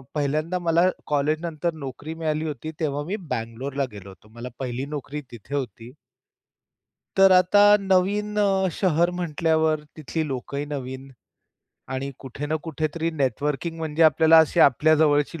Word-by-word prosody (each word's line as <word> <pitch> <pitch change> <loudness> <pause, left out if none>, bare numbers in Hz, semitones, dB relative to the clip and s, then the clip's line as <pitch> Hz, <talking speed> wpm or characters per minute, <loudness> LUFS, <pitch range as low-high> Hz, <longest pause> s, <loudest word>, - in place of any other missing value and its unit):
पहिल्यांदा 155 +5 -1
मला 170 +2 +4 0.2
कॉलेजनंतर 155 +3 -1
नोकरी 140 +4 -6
मिळाली 160 -1 -2
होती. 150 +1 -5
तेव्हा 145 -2 -1
मी 190 +6 -3 0.2
बंगलोरला 130 +5 -3
गेलो 100 -2 -11
होतो. 95 +3 -17
मला 120 +2 -7
पहिली 130 0 -3
नोकरी 145 +1 -6
तिथे 120 +4 -7
होती. 125 -3 -5 1.2
तर 195 0 +7
आता 185 +2 +5 0.2
नवीन 200 +2 +1
अ, 195 -2 +2
शहर 175 -1 +2
म्हटल्यावर 160 -1 +1
तिथली 160 +1 -3
लोकंही 140 +1 -4
नवीन 130 0 -7 0.8
आणि 135 +1 -3
कुठे 135 +2 -7
ना 155 +1 0
कुठेतरी 160 +2 -2
नेटवर्किंग 145 +6 -1
म्हणजे 160 0 -1
आपल्याला 160 +1 +6
अशी - - 0
आपल्या 150 +4 +5
जवळची 145 +2 +1
150 Hz, 135 wpm, -24 LUFS, 135-165 Hz, 1.2 s, तर